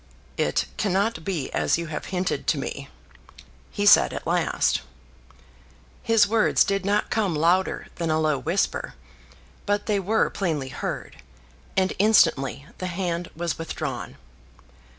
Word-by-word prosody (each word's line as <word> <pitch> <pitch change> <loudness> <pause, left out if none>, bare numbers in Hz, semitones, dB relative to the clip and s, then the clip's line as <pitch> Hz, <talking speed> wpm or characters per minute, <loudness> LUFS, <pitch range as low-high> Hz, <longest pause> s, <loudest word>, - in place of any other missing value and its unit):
"It - - 0
cannot 200 -3 0
be 165 -7 -3
as - - +2
you 170 - -3
have 155 -1 -5
hinted 180 -6 -2
to 150 - +2
me," 140 0 -5 0.8
he 205 - -2
said 205 - +7
at - - -6
last. - - +1 1.2
His 225 -2 +4
words 220 +1 +3
did 195 -1 -1
not 205 +2 0
come 200 -7 +1
louder 175 +5 +1
than 165 -2 -2
a 155 0 +2
low 155 -3 +1
whisper; 175 +5 -1 0.7
but 205 0 0
they 210 -2 +1
were 210 +4 +1
plainly 155 -9 -2
heard, - - -5 0.6
and 190 0 +2
instantly 140 -10 +3
the 185 - -3
hand 175 -1 -3
was 170 0 -3
withdrawn. 165 - -5
180 Hz, 135 wpm, -24 LUFS, 160-200 Hz, 1.2 s, said